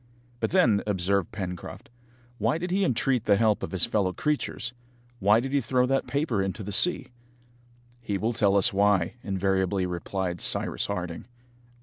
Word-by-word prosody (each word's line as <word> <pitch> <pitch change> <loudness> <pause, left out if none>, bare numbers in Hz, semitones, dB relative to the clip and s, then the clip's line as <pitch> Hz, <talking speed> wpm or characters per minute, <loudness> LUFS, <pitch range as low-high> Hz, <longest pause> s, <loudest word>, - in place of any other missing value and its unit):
"But - - 0
then," 120 - +3
observed 100 -1 0
Pencroft, 90 -1 -7 0.5
"why 155 - +1
did 180 +2 -4
he 195 +2 +2
entreat 125 - +1
the 100 - +5
help 105 0 +2
of - - -4
his 95 -3 -1
fellow 95 -3 0
creatures? 145 -4 -2 0.5
Why 105 +3 +4
did 135 +3 -4
he 140 - +3
throw 125 +1 +1
that 135 +1 0
paper 140 -8 0
into 95 +3 -3
the 105 - -5
sea?" 180 - +2 0.9
"He 105 -4 -2
will 110 +5 -1
tell 100 -2 +3
us 100 +3 +3
why," 100 -3 +2
invariably 95 -1 0
replied 90 0 -3
Cyrus - - -1
Harding. 90 -4 -4
100 Hz, 160 wpm, -27 LUFS, 95-125 Hz, 0.9 s, the